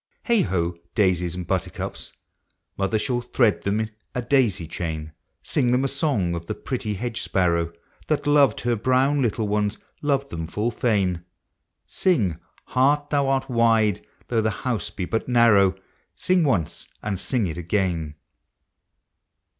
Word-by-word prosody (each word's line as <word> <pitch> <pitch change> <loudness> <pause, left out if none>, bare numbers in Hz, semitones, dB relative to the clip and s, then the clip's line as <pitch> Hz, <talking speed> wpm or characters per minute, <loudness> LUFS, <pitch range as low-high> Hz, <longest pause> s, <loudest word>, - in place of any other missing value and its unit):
Heigh 235 -4 +4
ho! 85 - -1 0.2
daisies 90 -5 +2
and 90 -1 -5
buttercups! - - -3 0.6
Mother 95 +2 0
shall 120 +2 -1
thread 120 -3 +2
them 105 +2 0 0.3
a 125 - -1
daisy 120 - +2
chain; 80 -2 -5 0.3
Sing 120 - +1
them 125 +2 +2
a - - +3
song 135 - 0
of 85 0 -5
the 110 - -3
pretty 110 -3 -3
hedge 120 +3 -3
sparrow, 85 -3 +1 0.4
That 150 -1 0
loved 145 -2 +4
her 120 0 +1
brown 130 +5 +2
little 110 -3 0
ones, 105 0 0 0.2
loved 140 -2 0
them 80 -1 -4
full 105 +7 -1
fain; 95 -8 0 0.6
Sing, 110 - +1
" - - -33
Heart, 145 +3 +2
thou 140 -2 +2
art 135 -1 +1
wide, 115 -4 +2 0.2
though 115 -2 +1
the 110 - +1
house 110 -2 -2
be 95 - -4
but 110 +5 -2
narrow," 110 -6 +5 0.2
— - - -40
Sing 180 -2 +2
once, 95 - -1 0.2
and 100 -3 -2
sing 120 -1 0
it 85 -1 -4
again. 85 -4 -1
110 Hz, 155 wpm, -24 LUFS, 90-130 Hz, 0.6 s, narrow